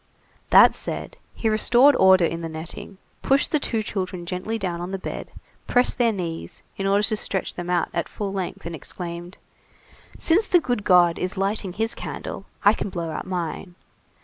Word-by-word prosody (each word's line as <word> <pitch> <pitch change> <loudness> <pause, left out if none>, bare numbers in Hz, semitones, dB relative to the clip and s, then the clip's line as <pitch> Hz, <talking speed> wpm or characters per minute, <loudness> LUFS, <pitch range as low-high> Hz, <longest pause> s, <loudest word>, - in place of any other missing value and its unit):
That - - +8
said, - - -5 0.2
he 225 - -1
restored 240 +6 +5
order 190 -4 +6
in 165 +1 -3
the 165 - -4
netting, 160 +4 -7 0.2
pushed 275 +1 +2
the 305 - +2
two 225 -5 -1
children 185 -4 -4
gently 185 +6 -3
down 180 -5 -3
on 175 - -4
the 195 - -3
bed, 185 - -6 0.4
pressed 250 +1 +2
their 235 -2 +4
knees, 170 -5 -5
in 195 - -2
order 200 +1 +3
to 215 - +1
stretch 195 -2 -2
them 175 0 -6
out 175 -2 +1
at - - -2
full 200 -2 -4
length, 190 -4 -4
and 170 - -5
exclaimed:— 170 +3 -6 0.8
"Since 385 +7 +3
the 355 - +5
good 245 -8 -2
God 175 -3 +5
is 180 +1 -3
lighting 195 -1 -1
his 225 +3 -1
candle, - - -6 0.2
I 205 - +8
can 205 - -4
blow 170 -3 -4
out 155 - -5
mine. 175 0 -4
190 Hz, 185 wpm, -24 LUFS, 175-215 Hz, 0.8 s, That